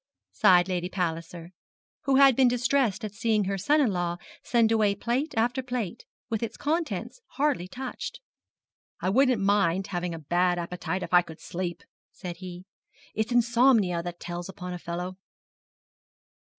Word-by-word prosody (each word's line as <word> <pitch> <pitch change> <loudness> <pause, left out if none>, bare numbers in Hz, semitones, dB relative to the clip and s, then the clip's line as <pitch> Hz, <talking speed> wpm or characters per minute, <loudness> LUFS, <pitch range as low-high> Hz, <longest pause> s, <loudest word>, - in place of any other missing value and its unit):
sighed 175 -1 +5
Lady 180 -1 -2
Palliser, 170 -1 -4 0.5
who 275 -1 +3
had 270 -2 +7
been 260 0 +5
distressed 245 -3 +1
at 205 - -6
seeing 220 -1 +1
her 195 +1 -1
son 290 +11 +2
in 260 -8 +3
law 175 -2 -1 0.2
send 230 -2 +2
away 210 -3 +3
plate 250 +9 -1
after 245 +4 +1
plate, 245 -4 -4 0.2
with 225 -3 -2
its 230 -1 -4
contents 330 +10 -2
hardly 280 -11 0
touched. 255 +6 -6 0.8
'I 185 - +1
wouldn't 255 -2 +3
mind 195 -2 +2
having 175 -1 -2
a - - -6
bad 175 +3 +1
appetite 180 +1 -3
if - - -7
I 175 - +8
could 160 -2 -12
sleep, 175 0 -5 0.3
said 175 -2 -7
he; 180 0 -9 0.5
'it's 220 +3 -1
insomnia 235 -6 +4
that 175 0 -7
tells 175 +1 -6
upon 180 -2 -6
a 180 - -6
fellow.' 180 +2 -5
195 Hz, 155 wpm, -27 LUFS, 175-240 Hz, 0.8 s, I